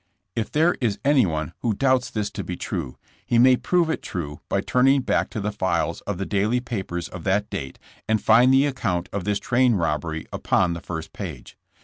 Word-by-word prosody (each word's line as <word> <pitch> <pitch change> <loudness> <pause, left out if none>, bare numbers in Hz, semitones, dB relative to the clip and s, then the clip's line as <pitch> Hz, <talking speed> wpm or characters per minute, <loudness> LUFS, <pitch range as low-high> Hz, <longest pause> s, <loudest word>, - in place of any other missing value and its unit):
If 115 -2 -2
there 165 +4 +3
is 110 -5 0
anyone 90 - +2
who 115 -4 0
doubts 130 +1 +2
this 105 -2 -3
to - - -5
be 90 - -5
true, 65 - -4 0.3
he 120 - +1
may 125 +2 +7
prove 175 +5 +1
it 160 - -2
true 75 -6 -5
by 100 - +1
turning 130 +3 +3
back - - 0
to - - -5
the 105 +1 -2
files 85 -4 -1
of 105 -3 -2
the 100 - -3
daily 105 +5 +1
papers 95 -8 -4
of 90 -3 -9
that 100 +2 +1
date 75 -10 -5 0.3
and 110 0 +3
find 120 +5 +5
the 135 +1 +5
account 105 -11 -2
of 100 -3 -3
this 105 -1 +1
train 125 0 +2
robbery 80 -2 -2
upon 90 -2 +1
the 85 - -6
first 80 -2 -6
page. - - -8
105 Hz, 205 wpm, -24 LUFS, 85-125 Hz, 0.3 s, may